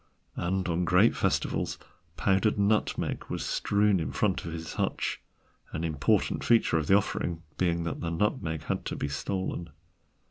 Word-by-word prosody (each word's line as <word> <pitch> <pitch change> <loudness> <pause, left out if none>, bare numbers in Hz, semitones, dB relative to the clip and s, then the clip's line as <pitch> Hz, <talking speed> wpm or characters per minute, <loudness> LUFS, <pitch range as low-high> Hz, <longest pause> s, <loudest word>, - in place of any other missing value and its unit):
And 95 +2 -1
on 85 +1 0
great 90 +6 +4
festivals - - 0 0.4
powdered 95 +4 +2
nutmeg 105 +1 +1
was - - -3
strewn 100 -2 +2
in 80 - -2
front 100 -4 0
of 85 - -4
his 80 0 -6
hutch, - - -1 0.5
an 80 - -3
important 75 -4 +1
feature 115 -8 +4
of 75 - -3
the 95 - +7
offering 85 -4 -2 0.2
being 85 -2 +1
that 85 - -3
the 85 - -2
nutmeg 85 - -1
had - - -2
to - - -3
be - - -2
stolen. 85 +4 -3
90 Hz, 155 wpm, -29 LUFS, 80-100 Hz, 0.5 s, the